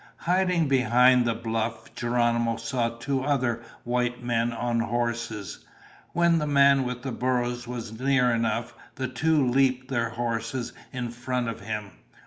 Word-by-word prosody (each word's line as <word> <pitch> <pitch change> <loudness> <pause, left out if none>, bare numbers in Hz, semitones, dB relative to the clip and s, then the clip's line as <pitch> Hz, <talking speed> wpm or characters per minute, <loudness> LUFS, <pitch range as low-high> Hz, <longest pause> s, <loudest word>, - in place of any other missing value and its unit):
Hiding 180 -2 +1
behind 125 -1 +5
the 115 -1 +1
bluff, 115 0 -3
Geronimo 120 -1 +1
saw 115 +1 -1
two 130 +3 -2
other 130 -4 0 0.2
white 120 0 -1
men 120 -1 +1
on 120 0 -1
horses. 115 -4 -2 0.5
When 170 -1 +3
the 150 - -1
man 140 -1 +5
with 125 0 -4
the 135 - -3
burros 120 -1 -1
was 120 -2 -5
near 130 -2 +3
enough, 115 0 -1 0.2
the 130 -1 -2
two 145 +2 +2
leaped 130 0 +2
their 120 -3 0
horses 115 +1 -3 0.2
in 125 -3 -4
front 125 0 -2
of 115 - -5
him. 105 -1 -5
120 Hz, 145 wpm, -26 LUFS, 115-130 Hz, 0.5 s, behind